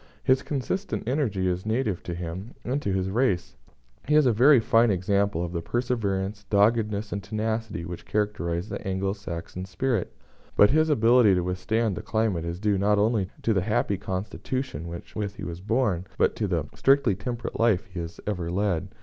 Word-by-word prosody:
His 130 0 +3
consistent 150 - -3
energy 115 -9 0
is 90 0 -1
native 110 -4 -1
to 85 - -4
him 90 +6 -6
and 135 +4 -1
to 100 - -1
his 95 0 -1
race. 105 -5 0 0.5
He 150 - +3
is 150 -2 +6
a 125 - +4
very 130 +5 +6
fine 115 +1 +4
example 100 -1 +1
of 85 - -6
the 85 -1 -3
perseverance, 105 -3 -1
doggedness, 105 0 +2
and 100 - -3
tenacity 110 -4 -3
which 85 0 -7
characterise 100 -4 -1
the - - -5
Anglo 95 0 -1
Saxon 90 -2 -6
spirit; 95 +3 -1 0.4
but 105 - +6
his 155 +2 +3
ability 115 -6 +5
to 90 - +1
withstand 95 +4 0
the - - -5
climate 110 -7 0
is 85 +1 -4
due 105 -1 +1
not 105 +1 +3
only 105 -2 +2
to 115 - +2
the 95 - +2
happy 100 -1 0
constitution 95 - -4
with 85 0 -7
which 105 -1 -3
he - - -8
was 85 0 -6
born, 105 -4 0
but - - +2
to - - -1
the - - -1
strictly 135 -6 +3
temperate 115 +5 -5
life 115 -5 +3
he 90 -2 -8
has 85 0 -6
ever 90 -5 -2
led. 90 -2 0
105 Hz, 185 wpm, -26 LUFS, 90-115 Hz, 0.5 s, is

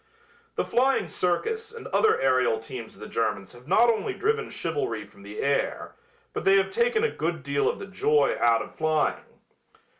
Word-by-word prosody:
The - - 0
Flying 265 +2 +2
Circus 440 - -1
and 465 0 -10
other 435 - +3
aerial 130 -3 +3
teams 115 +1 -8
of 100 - -17
the 105 - -7
Germans 100 -4 -2
have 120 +2 -16
not 195 +7 +5
only 235 - 0
driven 445 +1 0
chivalry 420 -3 -3
from - - -19
the 435 - -7
air, - - -1 0.4
but - - -3
they 390 0 +5
have 390 - +1
taken 470 +1 +1
a 460 - +2
good 160 -2 -3
deal 140 +1 +1
of - - -3
the - - -7
joy 150 -7 +2
out 115 -1 +4
of - - -12
flying. 155 -1 0
180 Hz, 185 wpm, -26 LUFS, -, 0.4 s, not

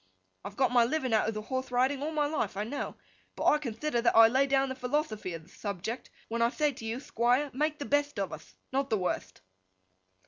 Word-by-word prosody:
I've 200 +1 -7
got 260 -2 +3
my 245 -1 +5
living 255 -1 0
out 220 - +3
of 220 - -2
the 215 - -4
horthe 260 +3 -3
riding 260 +3 +1
all 300 - -1
my 305 -2 +1
life, 290 -10 -2
I 205 - 0
know; 260 +7 -4 0.4
but - - -3
I 300 - +5
conthider 240 0 -2
that 235 - +3
I 225 0 +9
lay 265 +4 +3
down 270 0 +2
the - - -2
philothophy 250 - -2
of 165 - -9
the 170 - -20
thubject 205 +4 -5 0.2
when 235 +1 -2
I 235 - +4
thay 300 +3 +1
to 230 - -9
you, 225 +2 -2
Thquire, 255 +2 +1
make 300 +3 0
the 285 - -5
betht 290 -1 +1
of 195 -2 -2
uth: - - -11 0.2
not 275 +1 0
the 220 - +2
wurtht! 180 - -3
250 Hz, 235 wpm, -30 LUFS, 225-285 Hz, 0.4 s, I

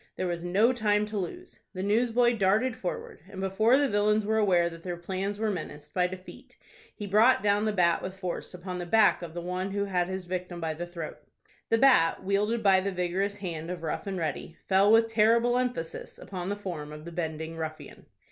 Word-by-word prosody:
There - - -2
was 175 -1 -3
no 205 +8 +3
time 210 -3 +1
to 210 0 -5
lose. 360 - -7 0.2
The 185 - -3
newsboy 240 +3 +2
darted 220 +5 +2
forward, 180 - -5
and 195 - -9
before 215 +6 +3
the 285 0 +3
villains 210 -1 +2
were 220 +1 +1
aware 180 -5 +3
that 165 -1 -8
their 175 0 -5
plans 190 +3 -3
were 215 0 0
menaced 150 -5 -7
by 180 -1 +2
defeat, 185 0 -11 0.4
he 210 - -6
brought 215 +3 +4
down 205 +1 +2
the 215 - +1
bat 175 -4 +2
with 190 +1 -6
force 180 -1 -5
upon 180 0 -6
the 175 - -5
back 220 +1 +4
of 170 -1 -8
the 175 - -3
one 180 +2 -3
who 200 0 0
had 180 -3 0
his 190 0 -5
victim 180 -1 -4
by 160 -1 -2
the 175 +3 -6
throat. 170 -3 -7 0.5
The 225 - +4
bat, 225 -10 +4
wielded 210 +4 0
by 195 -2 +5
the 195 +1 -2
vigorous 185 +3 -1
hand 170 -4 -5
of 180 -2 -5
Rough 160 +5 -3
and 195 -1 -3
Ready, 160 0 -4
fell 195 +2 +4
with 225 0 +6
terrible 230 +2 +3
emphasis 245 -11 -4
upon 185 -1 -6
the 205 - -1
form 175 -7 -6
of 150 +1 -10
the 170 - -7
bending 160 -1 -4
ruffian. 160 -1 -7
190 Hz, 215 wpm, -28 LUFS, 175-210 Hz, 0.5 s, with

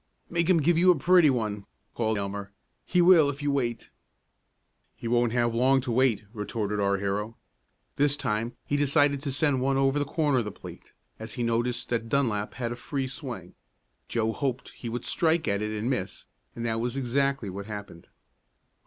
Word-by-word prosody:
"Make 170 0 +1
him 165 -5 +4
give 170 +2 +3
you 185 +1 +5
a 180 - +6
pretty 175 +2 +5
one!" 105 -5 -2 0.3
called 110 -2 0
Elmer. 100 0 -4 0.4
"He 180 -1 +3
will 170 -5 +7
if 145 +1 -5
you 145 - +1
wait." 120 -4 -2 1.0
"He 115 - -7
won't 120 0 +2
have 120 -1 +1
long 130 +3 +4
to 125 -1 -3
wait," 120 -3 +2
retorted 105 -1 -3
our 100 0 +2
hero. 105 +3 -3 0.6
This 145 0 +3
time 110 -1 -2
he 145 - -1
decided 145 -1 +3
to 145 -2 -3
send 140 -2 +1
one 135 +1 +1
over 135 +1 +2
the - - +1
corner 145 -3 +1
of 115 - -2
the 105 - -4
plate, - - -12 0.3
as 110 0 -5
he 120 - -2
noticed 120 +1 -1
that 115 -1 -2
Dunlap 115 -6 0
had 120 -2 -3
a - - -3
free 135 +2 -3
swing. 125 - -6 0.5
Joe 110 -1 0
hoped 135 -1 -3
he 120 - -8
would 120 +1 -4
strike 160 0 +1
at 100 +1 0
it 105 - -1
and 110 +2 -3
miss, 110 -8 -3 0.3
and 115 - -4
that 115 -1 0
was 120 +2 -2
exactly 135 -3 0
what 100 +2 -7
happened. 100 -5 -8
120 Hz, 190 wpm, -27 LUFS, 110-140 Hz, 1.0 s, will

